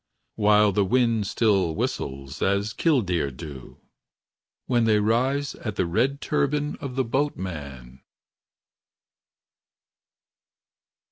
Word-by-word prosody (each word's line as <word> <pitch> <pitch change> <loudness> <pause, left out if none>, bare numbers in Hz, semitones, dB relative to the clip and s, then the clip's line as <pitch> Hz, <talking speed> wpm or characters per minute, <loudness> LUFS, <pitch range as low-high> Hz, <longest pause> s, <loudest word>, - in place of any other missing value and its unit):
While 105 -1 +4
the 100 +1 +2
wind 115 -1 +1
still 95 -8 +1
whistles 70 -1 -4
As 100 +2 +1
kildeer 95 - +1
do. 70 -1 -10 0.9
When 120 -2 +2
they 110 -1 +4
rise 130 +6 +1
At 105 -3 -6
the 95 - +1
red 125 +11 0
turban 150 0 0
Of 135 -4 -6
the 135 - +1
boatman. 75 - -4
105 Hz, 95 wpm, -25 LUFS, 85-130 Hz, 0.9 s, While